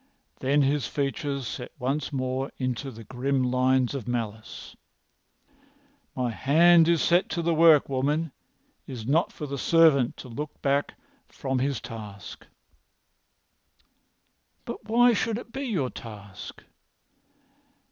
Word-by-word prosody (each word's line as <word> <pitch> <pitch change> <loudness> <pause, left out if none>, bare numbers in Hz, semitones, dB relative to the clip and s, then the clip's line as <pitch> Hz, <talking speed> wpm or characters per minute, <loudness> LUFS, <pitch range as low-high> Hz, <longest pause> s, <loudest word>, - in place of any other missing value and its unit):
Then 140 +2 +2
his 140 -1 +1
features 140 -1 -2
set 120 +2 -6
once 135 +5 -2
more 130 0 -2
into 130 +1 -3
their 115 -3 -10
grim 130 +4 -1
lines 130 0 +2
of 135 -5 -5
malice. 110 -3 -5 1.4
"My 125 -2 -1
hand 165 +7 +5
is 170 -2 +3
set 175 +2 +3
to 170 +1 -2
the 170 0 +2
work, 160 -2 +6
woman. 145 +4 0 0.6
It - - -7
is 115 -3 -7
not 155 +7 +2
for 150 - -7
the 140 -1 -5
servant 155 -7 +4
to - - -9
look 145 +5 -7
back 140 +1 +1 0.3
from 130 -1 -3
his 140 +1 -1
task." 105 -4 -9 2.2
"But - - -7
why 240 +2 +4
should 225 0 0
this 240 - -7
be 275 +3 -4
your 170 - -1
task?" 105 -4 -10
135 Hz, 130 wpm, -26 LUFS, 125-155 Hz, 2.2 s, work